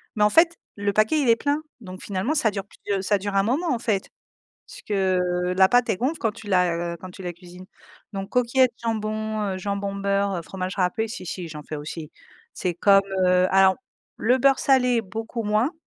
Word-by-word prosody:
bah, 210 -1 +3
en - - +4
fait, 335 +7 +4 0.2
le 205 0 -1
paquet 215 +9 +3
il 270 - 0
est 230 - +7
plein 285 +5 -1 0.2
donc 185 -3 -9
finalement 200 +8 -2
ça 270 -8 +3
dure 195 -1 -4
plus - - -21 0.2
de - - -2
ça 205 +2 +2
dure 200 +1 -4
un 195 - +4
moment 280 - 0
en 240 - -2
fait. 215 -5 -1 0.6
Puisque, - - -11
heu, 180 -2 +1
la 190 0 +7
pâte 245 +3 +3
elle - - +1
gonfle 275 - -1
quand 225 - 0
tu 225 0 -13
la, 180 -3 +2 0.2
heu, - - -8
quand 185 - -9
tu 185 +1 -11
la 175 -1 -4
cuisines, 180 +1 -13 0.5
donc 195 0 -5
coquillettes, 250 +1 +3
jambon, 215 -1 -2
heu, - - -5
jambon, 200 +1 -3
beurre, 200 0 0
heu, - - -3
fromage 185 +2 -5
râpé, 210 +4 0
si, 215 -4 -7
si, 175 0 -5
j'en 150 -2 -9
fais 155 - -6
aussi. 150 +1 -7 0.4
C'est 180 -2 -2
comme, 195 +2 +5 0.2
heu, 180 0 +4
alors 190 0 +5 0.4
le 245 +3 +2
beurre 270 +1 +3
salé 250 -3 +3
beaucoup 225 +4 -5
moins 215 +7 +1
200 Hz, 215 wpm, -24 LUFS, 185-230 Hz, 0.6 s, est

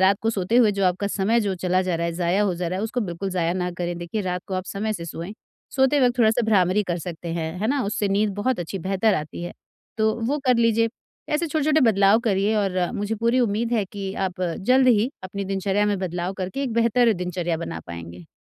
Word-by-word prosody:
रात 190 +1 +4
को 225 - +2
सोते 205 +2 0
हुए 230 -4 +6
जो 195 -1 0
आपका 185 +3 0
समय 210 +4 +1
जो 200 -3 -1
चला 185 +1 +1
जा 180 -2 -1
रहा 170 0 -1
है, 170 - -2
जाया 180 +3 +1
हो 190 -4 +1
जा 175 0 -3
रहा 185 +2 -3
है - - -2
उसको 240 +2 -2
बिल्कुल 190 -1 -3
जाया 170 -2 0
ना 180 -1 -1
करें 175 -1 -2
देखिए 175 +5 -4
रात 180 -1 -3
को 190 - -3
आप 185 0 -2
समय 215 +2 -2
से 170 -5 -5
सोएँ। 170 +4 -6 0.4
सोते 265 +2 +4
वक़्त 245 -1 +2
थोड़ा 220 -2 +5
सा 240 +2 0
भ्रामरी 195 -1 +3
कर 175 -3 -2
सकते 170 0 -7
हैं, 160 -1 -3
है 215 - 0
ना? 275 -1 +1
उससे 205 0 -1
नींद 205 +1 +2
बहुत 210 0 -1
अच्छी, 180 +3 -4
बेहतर 195 +4 +1
आती 155 +2 -4
है, 175 - -5 0.5
तो 220 0 +3
वो 290 +4 0
कर 250 -2 +5
लीजिए। 230 -1 +3 0.4
ऐसे 315 +3 0
छोटे-छोटे 310 0 +2
बदलाव 200 +2 +4
करिए 200 +2 +2
और 195 -3 0 0.2
मुझे 205 +2 -2
पूरी 235 +3 +1
उम्मीद 230 +1 0
है 215 -4 +2
कि 195 -1 -4 0.2
आप 180 0 -13
जल्द 255 +9 +3
ही 235 +2 +3
अपनी 200 +1 -4
दिनचर्या 195 +1 0
में 205 -2 0
बदलाव 180 0 -3
करके 190 +10 -3
एक 250 -4 -2
बेहतर 235 0 +3
दिनचर्या 175 -2 -2
बना 80 - -5
पाएँगे। 85 0 -9
195 Hz, 240 wpm, -23 LUFS, 180-225 Hz, 0.5 s, हुए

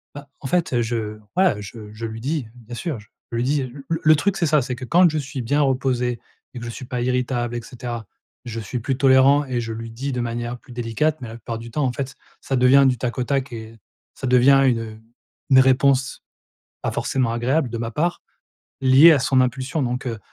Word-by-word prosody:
Bah 145 0 -10
en 135 - -6
fait, 175 +5 0
heu, 120 - +2
je 110 -2 -3 0.2
voilà 180 - +3
je 105 +1 -9
je 110 +2 -6
lui 110 0 -6
dis, 140 -1 -2
bien 120 -1 -12
sûr, 135 +1 -4
je 105 - -20 0.3
lui 115 +1 0
dis, 140 +2 +1
heu. 130 - -6 0.2
Le 165 - 0
le 155 0 +7
truc 195 +6 0
c'est 170 - +1
ça, 150 -1 +3
c'est 125 0 -4
que 125 +1 -7
quand 175 +6 +5
je 155 - -2
suis 135 -2 -4
bien 145 +5 +1
reposé 125 -3 0 0.3
et 125 - -7
que - - -9
je - - -5
suis 125 - -8
pas 125 0 -3
irritable 125 -1 -1
et 120 - -3
cetera, 120 -2 -7 0.4
je 115 -1 -5
suis 120 +3 -4
plus 130 +3 -2
tolérant 135 +1 +5
et 125 -3 -2
je 115 -1 -4
lui 115 0 -7
dis 135 +4 -4
de 125 - -2
manière 120 +1 -3
plus 125 - -18
délicate, 125 +7 -1
mais 120 - -6
la 110 - -8
plupart 115 0 -6
du 115 - -9
temps 145 +6 -1
en 125 - +1
fait 135 +1 -4
ç - - -20 0.3
ça 135 - -2
devient 130 +2 +6
du 125 - +1
tac 120 +1 -3
au 125 - -1
tac 135 0 -1
et 115 -1 -9 0.4
ça - - -6
devient 130 +2 +5
une, 120 -3 +3
heu, 110 -1 -8 0.5
une 130 -1 +7
réponse, 130 0 +3 0.6
pas - - -1
forcément 125 -4 0
agréable 125 +4 0
de 115 - -4
ma 115 0 -3
part, 170 +8 -1 0.6
liée 135 +5 +8
à 155 - +5
son 130 0 +3
impulsion. 130 +4 -1
Donc, 125 0 -2
heu, 115 -3 -4
125 Hz, 240 wpm, -22 LUFS, 115-135 Hz, 0.6 s, liée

